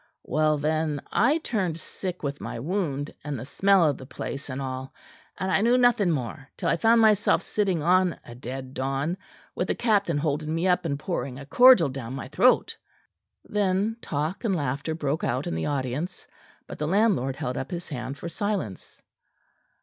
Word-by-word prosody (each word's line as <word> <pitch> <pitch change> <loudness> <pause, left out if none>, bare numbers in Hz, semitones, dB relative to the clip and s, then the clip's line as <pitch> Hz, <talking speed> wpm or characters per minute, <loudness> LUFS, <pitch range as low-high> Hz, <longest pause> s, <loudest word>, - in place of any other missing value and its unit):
Well, 155 0 +2
then 155 0 0
I 300 - +3
turned 195 - -2
sick 180 +2 -6
with 140 0 -3
my - - -5
wound 150 - -2
and 145 -1 -3
the 125 - -6
smell 195 +5 +4
of 145 -3 0
the 130 - -10
place 140 +1 -6
and 130 +1 -4
all; 130 0 -5 0.4
and 190 0 -2
I 190 - +3
knew 240 +3 +4
nothing 245 -6 +4
more 135 -1 -3
till - - -1
I - - +2
found 230 0 +5
myself 210 -2 +4
sitting 190 -7 0
on 180 +1 +3
a 120 - -10
dead 130 +2 -7
don, 135 +6 -1 0.4
with - - -2
the - - 0
captain 200 -9 +2
holding 155 +1 -1
me 170 +3 +1
up 180 -1 +2
and 140 -3 -1
pouring 140 -5 -3
a 140 - -8
cordial 245 - +7
down 130 -2 -6
my 130 - -6
throat." 245 - +3 0.7
Then 205 +2 0
talk 155 - -3
and 205 -5 +1
laughter 140 +1 -2
broke 150 -1 -2
out 130 +4 -1
in - - -2
the 80 0 -2
audience; 140 +5 -3 0.4
but - - -9
the 150 - -1
landlord 185 - +2
held 135 -3 -3
up - - -4
his 175 -2 -6
hand 135 -1 -5
for 170 - -6
silence. 195 - -4
155 Hz, 185 wpm, -26 LUFS, 135-190 Hz, 0.7 s, cordial